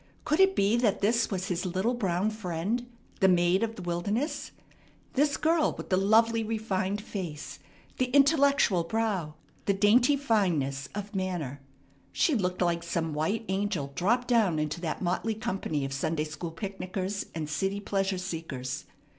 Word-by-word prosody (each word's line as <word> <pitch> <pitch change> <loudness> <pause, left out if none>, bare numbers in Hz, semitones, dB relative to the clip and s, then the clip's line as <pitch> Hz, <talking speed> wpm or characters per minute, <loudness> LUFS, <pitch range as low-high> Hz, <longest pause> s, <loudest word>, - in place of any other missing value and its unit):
Could 305 +3 +1
it 385 0 +5
be 200 +4 +3
that 220 -4 +1
this 230 +3 +2
was 190 -1 -3
his 175 -2 -1
little 190 +6 0
brown 195 -3 0
friend, 215 +4 -2 0.3
the 190 - +5
maid 180 +1 +4
of 225 0 -1
the 185 - -8
wilderness? 200 - -2 0.6
This 285 +2 +2
girl 320 0 +2
with - - -7
the 185 - +3
lovely, 225 +4 +4
refined 205 -3 -1
face, 175 -8 -6 0.4
the 255 - +3
intellectual 280 - +4
brow, 190 -5 -1 0.3
the 200 - +2
dainty 240 +8 +4
fineness 165 - 0
of 205 +1 -5
manner? 175 -8 -3 0.5
She 320 - +2
looked 185 -6 0
like 170 -1 +1
some 170 -2 -2
white 200 +10 -1
angel 190 -7 -1
dropped 235 - +1
down 220 -9 +3
into 155 +2 -2
that 165 +1 -3
motley 185 +5 0
company 190 - -2
of 135 - -4
Sunday 155 +2 -1
school 155 +2 -5
picknickers 190 +2 -4
and 155 -2 -3
city 195 +6 -1
pleasure 195 -1 -1
seekers. 160 -8 -5
195 Hz, 155 wpm, -28 LUFS, 170-225 Hz, 0.6 s, it